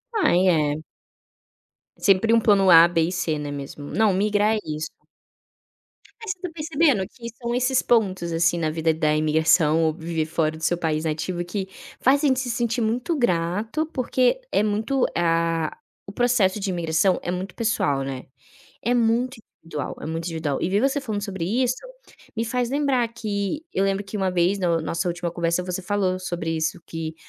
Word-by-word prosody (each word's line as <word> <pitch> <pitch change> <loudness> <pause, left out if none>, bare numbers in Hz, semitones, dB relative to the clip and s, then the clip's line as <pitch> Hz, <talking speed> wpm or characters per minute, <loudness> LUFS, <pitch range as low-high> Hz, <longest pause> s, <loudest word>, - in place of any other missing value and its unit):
Ai, 190 - +3
é. 155 -3 +1 1.1
Sempre 200 +3 +3
um 230 - +6
plano 200 -4 +4
A, 165 0 +9
B 170 -1 +1
e 165 - -1
C, 165 -4 -1
né, 145 -1 -5
mesmo 145 0 -7
não 215 -3 +3
migrar 210 +2 +2
é - - -1
isso. 155 0 -4 1.3
Mas 445 -3 -3
você 370 - -7
tá 360 - -4
percebendo, 305 - +1
que 235 -2 -9
são 235 0 -2
esses 250 +1 +2
pontos, 190 -7 +1
assim, 170 +1 +2
na 160 -2 0
vida 160 0 +1
da 155 -1 +1
imigração 155 +1 +3
ou 160 -1 +2
viver 165 -1 -3
fora 160 0 -1
do 160 - -11
seu 175 +2 +1
país 160 -2 -1
nativo, 175 +3 -2
que 190 +2 -4 0.3
faz 275 +3 +3
a - - +4
gente 260 -2 +2
se 260 -2 -3
sentir 235 0 -1
muito 240 +9 0
grato, 210 - 0
porque 255 - +1
é - - +2
muito, 220 +6 0
ah, 165 -1 +1 0.3
o - - -7
processo 215 -4 +2
de 195 -1 -2
imigração 170 +1 +1
é 175 - -3
muito 185 +1 -5
pessoal, 180 - 0
né. 135 -1 -5 0.6
É 240 +3 +1
muito 240 +2 +1 0.3
individual, 150 -3 -5
é - - -6
muito 165 +1 -4
individual 160 -5 -2
e - - 0
vê 195 +2 +2
você 275 +3 +1
falando 215 -6 -4
sobre 195 -4 -4 0.2
isso, 250 0 +1 0.6
me 225 - 0
faz 245 +1 -1
lembrar 275 -4 +1
que, 220 - -3
eu 195 - +1
lembro 195 +1 0
que 200 +2 -6
uma 190 -2 0
vez 180 +2 +1
na 170 -3 +1
nossa 170 +3 -2
última 175 0 -3
conversa, 170 +1 0
você 180 0 -4
falou 185 -1 0
sobre 175 -3 -4
isso 160 +2 -1
que, 160 -1 -5
185 Hz, 185 wpm, -23 LUFS, 165-230 Hz, 1.3 s, A